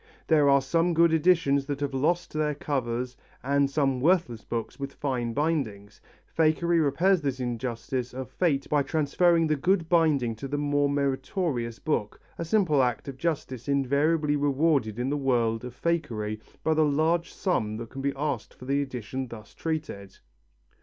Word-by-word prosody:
There 150 -3 +4
are 140 -1 +4
some 165 +4 +1
good 165 0 +4
editions 155 -4 +3
that 145 -1 -3
have 140 -1 -2
lost 170 +6 0
their 150 -1 0
covers 125 -4 -2 0.3
and 140 +1 +2
some 135 -2 +1
worthless 160 - +2
books 115 +3 -5
with 140 0 -5
fine 125 -4 -2
bindings 115 -9 -2 0.2
fakery 165 +1 +2
repairs 170 +6 +2
this 135 -3 -2
injustice 120 +1 -3
of 130 0 -7
fate 140 -4 0
by 145 -1 +2
transferring 165 +3 +2
the 155 -1 +1
good 175 +3 +1
binding 150 -9 +2
to 135 - -6
the 145 +2 -2
more 145 0 +1
meritorious 140 - -1
book, 105 -9 -2 0.2
a 170 - -2
simple 165 -6 +3
act 125 0 -1
of 135 -2 -6
justice 140 -7 -3
invariably 145 +3 +2
rewarded 140 -5 +1
in 125 +3 -1
the 145 - 0
world 120 -4 +1
of 125 0 -9
fakery 115 -11 -2 0.2
by 160 - +2
the 155 - +2
large 160 +4 +1
sum 110 - -1
that 115 0 -8
can 135 - -6
be 140 0 0
asked 140 -5 -3
for 125 - -12
the 140 +2 +1
edition 130 -1 -5
thus 110 -3 -11
treated. 150 -12 -5
140 Hz, 165 wpm, -27 LUFS, 125-160 Hz, 0.3 s, There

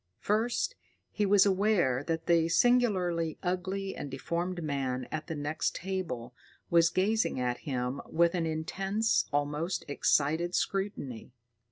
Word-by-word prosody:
First, 225 - 0 0.4
he 210 -1 0
was 200 0 +6
aware 190 -10 +2
that 165 -1 -2
the 165 -1 +3
singularly 180 -8 +2
ugly 190 +2 -2
and 145 - -6
deformed 170 +6 -3
man 130 -4 -2
at 155 0 -4
the 165 - -4
next 150 +2 -2
table 175 -11 -4 0.4
was 170 -1 +5
gazing 205 -3 +1
at 125 -1 -1
him 125 +1 -2
with 170 +1 +2
an 170 -3 0
intense, 195 +7 0
almost 150 +5 -1
excited 155 +4 +1
scrutiny. 170 - -3
170 Hz, 130 wpm, -30 LUFS, 145-195 Hz, 0.4 s, was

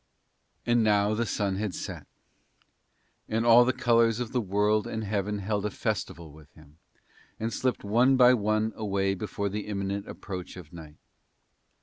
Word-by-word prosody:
And 120 -1 +3
now 105 -1 +3
the 115 +1 -1
sun 100 -3 -1
had 100 -4 -3
set, - - -7 1.2
and 115 +1 0
all 120 +1 +8
the 125 - +2
colours 115 -2 +2
of 120 -2 -4
the 125 - 0
world 105 +1 +1
and 110 0 -4
heaven 105 0 -2
had 100 - -7
held 105 -1 -1
a - - -3
festival 85 -4 -4
with 75 -1 -17
him, 75 0 -19 0.6
and 115 +1 -2
slipped 130 +4 -1
one 120 +6 +3
by 125 0 +7
one 110 -1 0
away 100 -2 -1
before 100 +1 -3
the 105 +1 -4
imminent 100 0 -3
approach 90 -2 -7
of 85 -3 -12
night. 80 -2 -11
105 Hz, 165 wpm, -27 LUFS, 95-115 Hz, 1.2 s, all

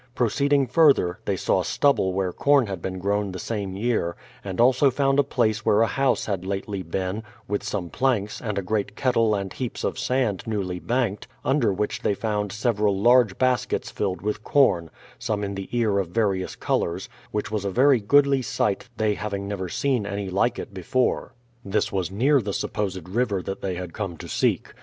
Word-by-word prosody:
Proceeding 140 +3 +2
further, 130 - +3
they - - 0
saw - - +1
stubble 140 -10 +2
where 90 -1 -1
corn 140 -3 +3
had 95 -5 -5
been 95 +1 -4
grown 100 +1 -1
the - - -5
same 100 -1 -4
year, 105 -5 0 0.3
and 95 -2 -5
also 130 +3 +5
found 135 +1 +1
a - - +6
place 115 -5 0
where 105 +2 +4
a - - +4
house 130 +4 +1
had 95 -4 -2
lately 100 +1 -3
been, 95 +4 -3 0.3
with 105 0 -1
some 90 -5 -4
planks, 115 -6 0
and 105 -3 -3
a 100 - -1
great 105 +1 -2
kettle 115 -4 +2
and 100 -2 -4
heaps 125 -3 -5
of - - -2
sand 125 -7 0
newly 95 -5 -2
banked, 115 -2 -1 0.2
under 135 -6 +2
which 100 +2 -2
they 100 - +1
found 105 -2 -2
several 105 -3 +1
large 120 -2 +4
baskets 130 -1 0
filled 95 -3 -2
with 105 0 -2
corn, 95 - +3 0.3
some 110 -4 -2
in 100 0 -3
the 95 -1 -6
ear 110 -5 +1
of 95 - -1
various 95 -1 -1
colours, 85 +2 -1 0.2
which 105 0 -3
was 105 -2 -1
a 100 - -1
very 130 +5 +4
goodly 140 +5 +4
sight 105 -1 -1
they 110 -1 +2
hav 105 0 -4
ing 100 0 -4
never 95 -3 -4
seen 125 -1 0
any 100 -1 -4
like 115 +6 +1
it - - -7
before. 100 +7 -1 0.3
This 100 +2 0
was 95 -3 -1
near 130 +8 +3
the 100 -2 -4
supposed 95 -5 -3
river 100 -2 0
that 95 - -5
they 95 -2 -2
had 90 -2 -6
come 95 -6 -4
to - - -9
seek. - - 0
105 Hz, 195 wpm, -24 LUFS, 95-120 Hz, 0.3 s, a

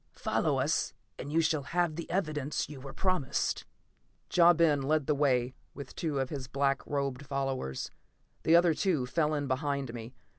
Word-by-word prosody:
Follow - - +1
us - - 0 0.2
and 140 - -5
you 165 +2 +3
shall 155 -2 +1
have 170 +3 0
the 170 - -6
evidence 155 -6 -1
you 140 -2 -9
were 135 0 -8
promised." 180 -4 0 0.7
Ja 175 0 +7
Ben 160 -4 +3
led 150 +1 +1
the 150 - +2
way 130 -3 +2 0.2
with 140 -2 -8
two 155 -4 -2
of 135 -1 -2
his 135 -4 -5
black 140 +1 +1
robed 140 -2 -2
followers. 135 - -3 0.5
The 165 - +4
other 170 -1 +5
two 155 -5 +1
fell 155 +4 +1
in 145 -1 -2
behind 140 -2 -1
me. 120 +1 -8
145 Hz, 175 wpm, -30 LUFS, 135-160 Hz, 0.7 s, Ja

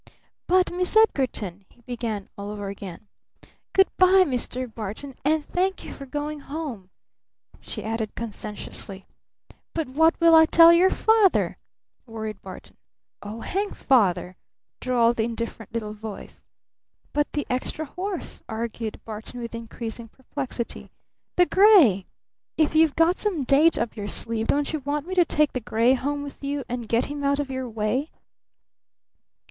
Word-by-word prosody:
"But 365 0 +3
Miss 360 +4 +1
Edgarton 235 - +1
" - - -45
he 240 - -25
began 230 -5 -4
all 200 0 -6
over 205 -1 -5
again. 200 +1 -9 0.6
"Good 385 0 +5
by, 370 +1 +6
Mr. 255 -2 -2
Barton! 225 +4 -6
And 305 +1 +1
thank 380 +2 -1
you - - -8
for 275 - -10
going 295 +2 -4
home!" 275 - -6 0.7
she - - -7
added 220 -1 -3
conscientiously. 210 -3 -6 0.7
"But 320 -2 -1
what 320 +5 +3
will 335 0 +6
I 320 0 +8
tell 335 +1 +8
your 360 +3 +5
father?" 440 -3 +3 0.5
worried 220 -2 -6
Barton. 185 -1 -11 0.4
"Oh 215 +3 -7
hang 400 +2 -2
Father," 185 -8 +2 0.4
drawled 240 -2 +2
the 220 - +2
indifferent 230 -2 -5
little 220 -2 -4
voice. 215 -1 -9 0.7
"But 295 0 0
the 290 - -1
extra 260 +5 -2
horse?" 365 +4 -5
argued 225 0 -4
Barton 220 +3 -7
with 235 -1 -6
increasing 230 0 -7
perplexity. 260 0 -6 0.5
"The 355 - +5
gray? 350 - +6 0.5
If 310 -2 +2
you've 315 -2 +4
got 330 +3 +3
some 370 -9 -1
date 290 +6 +4
up 235 - -2
your 205 -2 -5
sleeve, 225 +1 -1
don't 290 +2 +1
you 310 - -1
want 290 +2 -3
me 370 - -5
to 360 -2 +4
take 300 -1 +1
the 255 - -1
gray 230 +2 +2
home 285 +2 -2
with 285 - -9
me, 280 0 -2
and 240 -2 -5
get 230 +1 +2
him 290 0 -5
out 280 0 +2
of 280 -2 -3
your 260 -1 -4
way?" 225 +7 -1
255 Hz, 155 wpm, -25 LUFS, 225-315 Hz, 0.7 s, I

